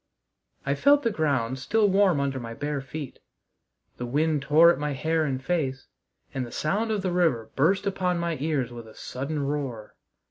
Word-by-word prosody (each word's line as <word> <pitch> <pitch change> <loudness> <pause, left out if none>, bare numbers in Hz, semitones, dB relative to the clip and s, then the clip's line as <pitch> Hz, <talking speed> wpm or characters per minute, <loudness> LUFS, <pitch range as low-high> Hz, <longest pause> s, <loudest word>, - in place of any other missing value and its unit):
I 140 - +1
felt 285 - +4
the 230 - +1
ground 135 - 0
still 210 +11 +2
warm 190 -5 +3
under 135 -1 -1
my 115 -1 -7
bare 145 +2 -3
feet; 135 +1 -7 0.8
the 120 - -4
wind 150 +3 +1
tore 155 +4 +6
at - - -2
my 150 -1 -1
hair 160 +3 0
and 135 -3 -1
face; 135 -3 -2 0.5
and 130 - -2
the 120 - -8
sound 205 +9 -1
of 210 -3 -1
the 185 - 0
river 160 -11 +1
burst 190 +8 +2
upon 185 -3 0
my 170 -1 -1
ears 140 -5 -1
with 120 -1 -9
a 110 - -14
sudden 140 +3 -4
roar. 135 -7 -4
150 Hz, 185 wpm, -26 LUFS, 130-175 Hz, 0.8 s, tore